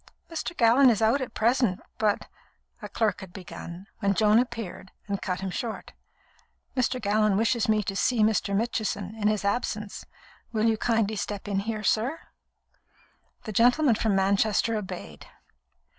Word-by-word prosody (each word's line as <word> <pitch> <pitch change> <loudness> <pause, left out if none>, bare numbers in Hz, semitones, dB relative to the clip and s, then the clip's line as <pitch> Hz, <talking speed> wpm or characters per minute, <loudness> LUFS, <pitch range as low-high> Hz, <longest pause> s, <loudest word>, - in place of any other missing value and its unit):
"Mr. 330 +1 -4
Gallon 245 +3 +6
is 225 - +2
out 225 +5 +3
at 250 -3 -5
present, 230 -4 +2 0.2
but 210 -2 +1 0.3
" - - -40
a 210 - -7
clerk 215 0 0
had 190 -2 -10
begun, 180 0 -9
when 200 -2 +1
Joan 215 +2 +5
appeared 230 -6 -4 0.2
and 200 -1 -2
cut 180 0 -3
him 190 -1 -3
short. 225 +3 -5 0.8
"Mr. 255 0 0
Gallon 210 -2 +2
wishes 225 +1 +1
me 215 -1 +3
to 195 - -4
see 225 +2 +2
Mr. 210 -2 +1
Mitchison, 215 -2 -2
in 215 -2 -1
his 210 -1 0
absence. 210 -1 -2 0.5
Will 220 -1 0
you 225 -1 +3
kindly 220 -1 0
step 205 0 -4
in 200 -1 0
here, 215 +1 -3
sir?" 240 +10 +1 1.2
The 215 - -5
gentleman 245 +5 +4
from 215 -2 +1
Manchester 200 +3 +2
obeyed. 180 - -7
215 Hz, 160 wpm, -27 LUFS, 200-230 Hz, 1.2 s, Gallon